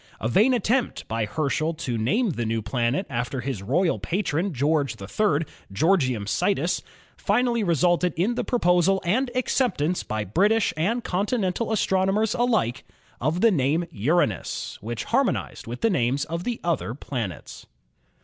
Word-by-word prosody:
A 110 - -1
vain 210 - +4
attempt 240 +2 0
by 115 0 -1
Herschel 155 +4 -1
to 125 -6 -3
name 190 - +1
the 120 - -3
new 115 0 -1
planet 120 - 0
after 125 +1 -3
his 125 -5 -4
royal 165 - +1
patron, 185 0 -1
George 140 -3 0
III., 155 - 0 0.3
"Georgium 130 - +2
Sidus," 180 - 0 0.3
finally 235 +2 +1
resulted 175 0 +2
in 190 +9 +1
the - - -2
proposal 185 -4 +3
and 245 +9 +1
ac 255 - -1
ceptance 175 - 0
by 110 -1 -3
British 200 - +2
and 215 +10 0
continental 200 +2 -1
astronomers 195 +1 +1
alike 220 - +1 0.4
of 165 +4 0
the 230 - +6
name 155 +1 +1
Uranus, 125 - -1
which 115 +1 -4
harmonized 255 - -1
with 120 +2 -6
the 225 - +3
names 135 -2 +1
of 170 +2 -4
the 240 -2 -2
other 165 -8 -1
planets. 120 -10 -6
170 Hz, 150 wpm, -25 LUFS, 125-205 Hz, 0.4 s, the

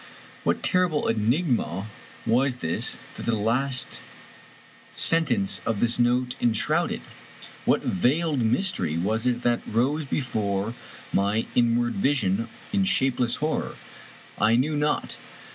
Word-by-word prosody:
What - - 0
terrible 180 -5 +2
enigma 115 - 0 0.4
was 125 +3 +2
this 80 -8 -1 0.2
that - - -7
the 115 - +2
last 125 +5 -1 0.9
sentence 130 -12 +2
of 115 -3 -1
this 120 0 +2
note 125 +1 +2
enshrouded? 115 -3 +1 0.6
What - - +2
veiled 140 - +1
mystery 115 - +1
was 110 +7 0
it 125 0 0
that 120 0 +2
rose 140 +7 0
before 105 -6 -1 0.4
my 100 +3 +1
inward 120 +2 +2
vision 115 - +1 0.2
in 200 -1 +3
shapeless 130 -9 +2
horror? 155 +1 -2 0.6
I 110 +2 +4
knew 145 +6 +1
not. 150 0 -1
120 Hz, 115 wpm, -25 LUFS, 110-140 Hz, 0.9 s, I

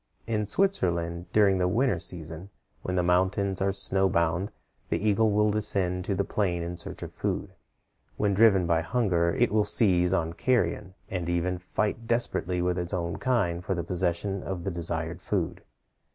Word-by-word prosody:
In 110 -2 -1
Switzerland, 85 - 0
during 100 -3 +4
the 90 - +2
winter 110 -1 +1
season, 80 +2 -3 0.3
when 90 - -3
the 90 - +2
mountains 95 +2 +1
are 100 0 +2
snow 95 0 +1
bound, 85 +3 +1 0.4
the - - +1
eagle 110 +2 +3
will 105 +1 +3
descend 95 -4 0
to 100 - -1
the 100 - +1
plain 90 -4 -1
in 85 +1 -4
search 85 - -6
of - - -8
food. - - -3 0.6
When 105 -1 +1
driven 100 -3 +5
by 85 -1 +2
hunger, 85 -4 +1
it 120 +5 +1
will 105 0 +3
seize 90 -5 +3
on 85 -3 0
carrion, 105 -4 0 0.2
and 90 -3 -2
even 90 +1 0
fight 105 +5 -2
desperately 90 -7 0
with 90 0 0
its 85 +1 -2
own 85 -1 -3
kind 100 -10 0
for 95 - -1
the 85 - -2
possession 90 +2 -1
of 95 -3 -5
the 95 - -2
desired 85 -1 -3
food. - - -2
95 Hz, 175 wpm, -27 LUFS, 85-105 Hz, 0.6 s, driven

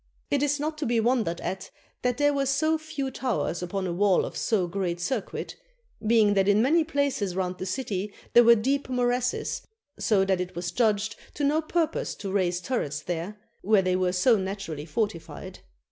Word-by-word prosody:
It 280 - +2
is 290 0 +1
not 305 +1 -3
to 300 - -1
be 235 0 +2
wondered 225 -7 +1
at 190 +1 -4 0.3
that 250 -1 0
there 290 0 +3
were 275 -1 0
so 310 +4 +2
few 285 -4 -4
towers 245 -10 -2
upon 190 +2 -3
a 175 - -2
wall 195 +1 +3
of - - -7
so 205 -5 +1
great 175 -1 -2
circuit, 220 +4 -3 0.5
being 220 -2 +5
that 195 -1 +2
in 205 +1 +4
many 310 +8 +4
places 280 - -1
round 185 -1 -2
the 185 - -4
city 205 -2 -3 0.2
there 240 - +8
were 235 0 +8
deep 270 +5 0
morasses; 245 0 0 0.4
so 195 -3 +3
that 190 -1 +1
it 180 -1 -5
was 175 0 -3
judged 215 -3 +1 0.2
to 290 - -3
no 300 +3 +3
purpose 325 0 -1
to 195 -2 -5
raise 180 -2 +1
turrets 150 - -2
there, 175 +4 -4 0.2
where 205 -1 +3
they 185 0 +1
were 185 -1 +1
so 215 +6 +4
naturally 190 -6 -5
fortified. 175 0 -4
210 Hz, 190 wpm, -27 LUFS, 185-265 Hz, 0.5 s, there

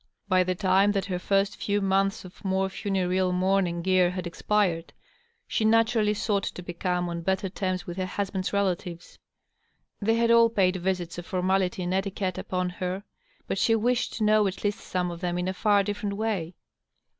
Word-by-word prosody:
By 185 -2 +4
the 185 0 -1
time 195 +2 +3
that 195 -1 -1
her 185 -3 -3
first 195 +2 0
few 205 0 +1
months 195 0 +1
of 185 +3 -14
more 190 0 0
funereal 190 -2 0
mourning 180 -2 +1
gear 185 -1 +4
had 180 0 -4
expired, 175 -1 0 0.5
she 225 - -1
naturally 220 -1 +3
sought 200 -1 0
to 180 - -6
become 175 0 -2
on 170 0 -4
better 190 +2 -1
terms 185 -1 -2
with 175 +1 -7
her 185 -1 -1
husband's 190 -1 -2
relatives. 180 -3 -2 0.8
They 225 +2 +2
had 230 0 +3
all 230 0 +6
paid 195 -4 +2
visits 180 -2 -2
of 175 - -9
formality 185 0 0
and 175 +1 -1
etiquette 190 -1 -2
upon 180 -1 -2
her, 185 +2 -2 0.4
but - - -2
she 225 - +3
wished 240 +2 0
to 220 - -2
know 215 -1 +4
at 190 0 -5
least 205 -1 0
some 180 -1 -2
of 170 0 -8
them 175 -1 -1
in 180 +1 -1
a 185 - -1
far 205 +1 +3
different 205 0 -3
way. 195 -6 -2
190 Hz, 185 wpm, -27 LUFS, 180-205 Hz, 0.8 s, all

